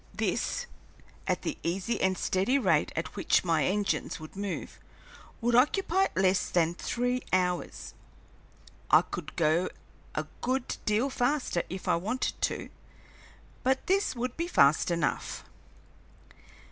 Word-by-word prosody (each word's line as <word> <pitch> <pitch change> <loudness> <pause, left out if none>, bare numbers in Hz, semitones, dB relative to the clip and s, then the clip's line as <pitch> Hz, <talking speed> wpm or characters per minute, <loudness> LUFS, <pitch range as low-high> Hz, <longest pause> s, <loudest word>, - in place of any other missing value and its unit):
This, - - -1 0.6
at - - 0
the - - -3
easy 190 +6 -1
and 190 -1 +2
steady 195 +9 +1
rate 185 - +2
at 165 - -3
which 195 - +2
my 165 -5 +2
engines 205 +1 0
would 155 +3 -10
move, 200 -2 -5 0.6
would 240 +1 +1
occupy 375 +9 +3
less 190 0 +2
than 170 -1 +2
three 245 +7 -1
hours. 180 -1 -1 1.0
I - - +7
could 160 -3 -7
go 165 +2 +2 0.5
a - - -1 0.2
good 255 0 -1
deal 225 +6 +2
faster 250 -8 +1
if 185 +1 -6
I - - +3
wanted 220 +9 -1
to, - - -1 0.9
but 265 +1 +1
this 385 -4 +1
would 250 +1 -3
be 335 +1 -2
fast 145 - +4
enough. 170 -3 -1
195 Hz, 130 wpm, -29 LUFS, 175-255 Hz, 1.0 s, I